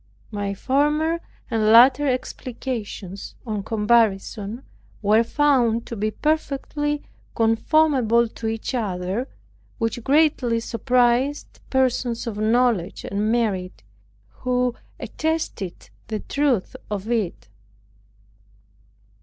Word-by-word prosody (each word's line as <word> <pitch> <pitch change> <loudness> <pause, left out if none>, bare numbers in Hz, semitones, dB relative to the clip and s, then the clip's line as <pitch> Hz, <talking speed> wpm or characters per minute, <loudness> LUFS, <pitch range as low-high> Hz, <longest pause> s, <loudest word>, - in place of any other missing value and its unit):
My 200 -1 -3
former 300 - +1 0.3
and 220 -2 +1
latter 255 +5 +7
explications, 235 -6 -4
on 215 -3 -2
comparison, 215 +1 +1 0.4
were 215 +3 +4
found 240 -4 +2
to 235 - -6
be 215 0 -1
perfectly 295 +1 -1 0.3
conformable 235 0 +3
to 225 0 -6
each 225 +3 -3
other, 200 +1 -2 0.5
which 225 0 -2
greatly 275 -5 +3
surprised 245 +4 +1
persons 255 -3 0
of 215 -3 -4
knowledge 220 -4 +1
and 210 +2 -1
merit, 190 - -1 0.4
who 250 - -1 0.3
attested 315 - -3 0.2
the 215 -1 -3
truth 275 -9 0
of 210 +2 -4
it. 215 - -2
235 Hz, 95 wpm, -23 LUFS, 215-265 Hz, 0.5 s, latter